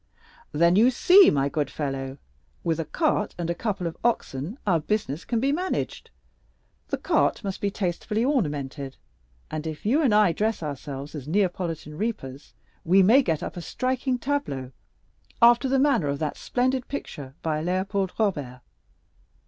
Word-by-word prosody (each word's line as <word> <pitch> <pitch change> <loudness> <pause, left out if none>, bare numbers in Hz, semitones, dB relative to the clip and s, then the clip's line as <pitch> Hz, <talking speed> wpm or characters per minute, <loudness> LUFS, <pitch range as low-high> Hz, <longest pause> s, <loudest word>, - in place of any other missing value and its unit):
"Then 170 +4 +4
you 225 +5 +6
see, 365 +10 +7
my 140 -1 +1
good 145 -1 -1
fellow, 135 -2 -4 0.5
with 165 -2 0
a 165 - -1
cart 300 - 0
and 170 -1 -2
a - - +1
couple 200 -1 -3
of 165 - -3
oxen 195 - -1
our 180 -5 +3
business 165 -3 -2
can 235 - 0
be 270 +4 +1
managed. 360 +5 -2 0.8
The - - -2
cart - - +1
must 195 -2 -4
be 200 - +1
tastefully 205 +4 -2
ornamented; 145 - -2 0.5
and 155 +1 -4
if 155 +3 -7
you 270 +9 +3
and 270 -7 +3
I 210 -3 +5
dress 210 +2 -1
ourselves 140 -1 -6
as 145 -3 -7
Neapolitan 170 -4 -1
reapers, 145 - -5 0.3
we 190 +3 +5
may 235 +9 +6
get 165 - -1
up - - -5
a 175 - -5
striking 255 +6 -1
tableau, 235 - -3 0.7
after 240 +3 +5
the 270 - +3
manner 270 - +3
of 140 0 -1
that 155 +1 -2
splendid 255 0 -1
picture 140 - -7
by 155 -1 -1
Léopold 190 +2 -1
Robert. 145 - -1
180 Hz, 160 wpm, -25 LUFS, 150-235 Hz, 0.8 s, see